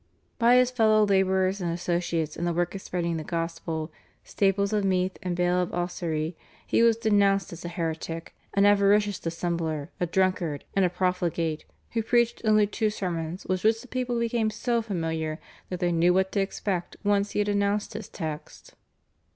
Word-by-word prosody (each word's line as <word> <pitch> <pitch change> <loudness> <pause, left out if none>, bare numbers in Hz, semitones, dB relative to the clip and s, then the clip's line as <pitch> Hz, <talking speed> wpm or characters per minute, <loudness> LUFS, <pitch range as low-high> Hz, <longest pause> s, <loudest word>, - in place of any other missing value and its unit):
By 235 +1 +6
his 250 0 +4
fellow 215 -3 +4
labourers 190 -1 +2
and 170 -1 -1
associates 170 -2 -1
in - - -5
the 175 - 0
work 175 +1 0
of 195 - -6
spreading 170 -3 -2
the 155 - -4
gospel, 165 -1 -3 0.3
Staples 200 +1 +1
of 210 -1 +1
Meath 185 -1 +1
and 180 -2 -2
Bale 180 0 +2
of 180 - -2
Ossory, 170 -2 -2 0.3
he - - +2
was 230 -1 +5
denounced 200 -5 +2
as 170 - -9
a 175 - -4
heretic, 165 -1 -4 0.2
an 200 0 +5
avaricious 205 0 +4
dissembler, 165 -2 -2
a 175 - 0
drunkard, 175 -5 0
and 195 - +4
a 180 - +3
profligate, 175 -3 -1 0.3
who 230 - 0
preached 235 +1 +1
only 215 -1 +5
two 215 +1 0
sermons 175 -4 -4
with 185 -1 -1
which 220 +1 +3
the - - -13
people 250 -1 -2
became 230 -1 +1
so 235 +2 0
familiar 160 -6 -3 0.3
that 180 - -4
they 175 -1 +1
knew 170 +1 +3
what 190 0 +2
to 205 - 0
expect 195 -2 -2
once 205 0 +1
he - - -3
had 210 0 +1
announced 205 0 0
his 215 -2 -7
text. 155 -4 -7
185 Hz, 180 wpm, -27 LUFS, 170-205 Hz, 0.3 s, By